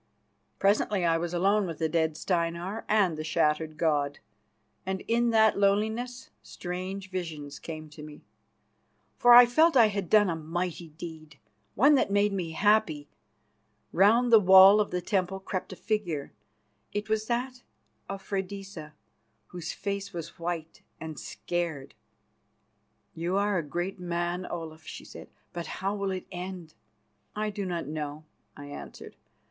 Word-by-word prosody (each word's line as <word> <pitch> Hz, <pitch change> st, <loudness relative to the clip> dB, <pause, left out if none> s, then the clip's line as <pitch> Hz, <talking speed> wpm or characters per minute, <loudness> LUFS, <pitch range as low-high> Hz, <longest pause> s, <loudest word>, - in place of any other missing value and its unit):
Presently 200 Hz, -1 st, +2 dB
I 165 Hz, -1 st, +2 dB
was 170 Hz, 0 st, -3 dB
alone 195 Hz, +3 st, +2 dB
with 165 Hz, -2 st, -5 dB
the 160 Hz, -, 0 dB
dead 160 Hz, -1 st, 0 dB
Steinar 175 Hz, +4 st, -2 dB
and 200 Hz, -6 st, +3 dB
the -, -, -3 dB
shattered 155 Hz, 0 st, 0 dB
god, 145 Hz, -3 st, 0 dB, 0.7 s
and 190 Hz, 0 st, -3 dB
in 235 Hz, +1 st, +1 dB
that 220 Hz, -2 st, +4 dB
loneliness 220 Hz, +5 st, 0 dB
strange 185 Hz, +2 st, -6 dB
visions 155 Hz, -6 st, -5 dB
came 155 Hz, -1 st, -7 dB
to 150 Hz, -, -11 dB
me, 150 Hz, -1 st, -11 dB, 1.0 s
for 245 Hz, -, +6 dB
I 245 Hz, 0 st, +11 dB
felt 315 Hz, +7 st, +3 dB
that -, -, +7 dB
I 225 Hz, -, +6 dB
had 200 Hz, -4 st, -4 dB
done 210 Hz, -1 st, +5 dB
a 170 Hz, -, -1 dB
mighty 170 Hz, +1 st, -4 dB
deed, 155 Hz, -2 st, -10 dB, 0.4 s
one 280 Hz, +8 st, +5 dB
that 270 Hz, -, +3 dB
made 205 Hz, 0 st, +2 dB
me 175 Hz, -4 st, -3 dB
happy. 185 Hz, -6 st, +2 dB, 0.8 s
Round 225 Hz, +7 st, +4 dB
the 225 Hz, -, +10 dB
wall 190 Hz, +1 st, +8 dB
of 205 Hz, -, -1 dB
the 180 Hz, 0 st, -3 dB
temple 190 Hz, -1 st, -1 dB
crept 190 Hz, -1 st, -5 dB
a -, -, -7 dB
figure; 180 Hz, -10 st, -3 dB, 0.6 s
it 205 Hz, 0 st, -3 dB
was 220 Hz, 0 st, -1 dB
that 250 Hz, +1 st, -2 dB, 0.5 s
of 195 Hz, 0 st, -6 dB
Freydisa, 195 Hz, -5 st, -5 dB, 0.6 s
whose 175 Hz, -2 st, -5 dB
face 200 Hz, -1 st, -4 dB
was 170 Hz, -1 st, -7 dB
white 165 Hz, -1 st, -5 dB, 0.2 s
and 160 Hz, -3 st, -7 dB
scared. 165 Hz, -6 st, -4 dB, 1.2 s
"You 175 Hz, +4 st, -2 dB
are 200 Hz, -2 st, +1 dB
a -, -, -3 dB
great 175 Hz, +6 st, -4 dB
man, 175 Hz, +1 st, -2 dB
Olaf," 160 Hz, -2 st, -7 dB
she -, -, -9 dB
said; -, -, -11 dB, 0.2 s
"but 170 Hz, -2 st, -5 dB
how 195 Hz, +2 st, -3 dB
will 200 Hz, -1 st, -2 dB
it 185 Hz, -1 st, -4 dB
end?" 180 Hz, -3 st, -7 dB, 0.6 s
"I 215 Hz, 0 st, -2 dB
do 200 Hz, -2 st, -4 dB
not 175 Hz, -2 st, -3 dB
know," 150 Hz, 0 st, -5 dB, 0.3 s
I 145 Hz, -, -9 dB
answered. 145 Hz, -, -10 dB
180 Hz, 155 wpm, -28 LUFS, 160-205 Hz, 1.2 s, I